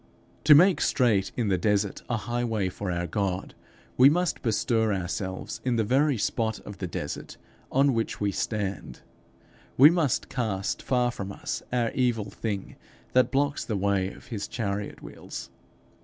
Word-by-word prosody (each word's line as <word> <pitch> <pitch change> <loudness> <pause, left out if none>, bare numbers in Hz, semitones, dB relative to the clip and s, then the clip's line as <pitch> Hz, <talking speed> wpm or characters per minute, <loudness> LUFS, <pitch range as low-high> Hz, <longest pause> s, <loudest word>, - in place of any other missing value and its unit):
To 150 0 +9
make 185 +5 +5
straight 110 -7 +2
in 115 -4 0
the 95 -2 +2
desert 100 +1 0
a 120 - +1
highway 110 -2 -1
for 95 +1 -5
our 85 0 -1
God, 95 0 -2 0.4
we 130 +2 +8
must 175 +1 0
bestir 115 -1 +1
ourselves 95 0 -4
in 125 -2 +1
the 115 - +2
very 135 +5 +2
spot 110 +1 -1
of 100 -2 -10
the 95 - -3
desert 85 - -6 0.3
on 135 +1 +4
which 115 -1 -2
we 105 -1 0
stand; 100 - -3 0.8
we 145 +5 +9
must 160 -7 +1
cast 110 -7 -2
far 125 -2 +1
from 100 -4 -6
us - - -4
our 120 -2 +1
evil 120 -6 0
thing 100 -2 -4 0.4
that 130 0 +4
blocks 140 +1 0
the 110 - -2
way 95 -1 +1
of - - -14
his 105 -4 -4
chariot 100 -3 -4
wheels. - - -8
110 Hz, 160 wpm, -27 LUFS, 100-125 Hz, 0.8 s, To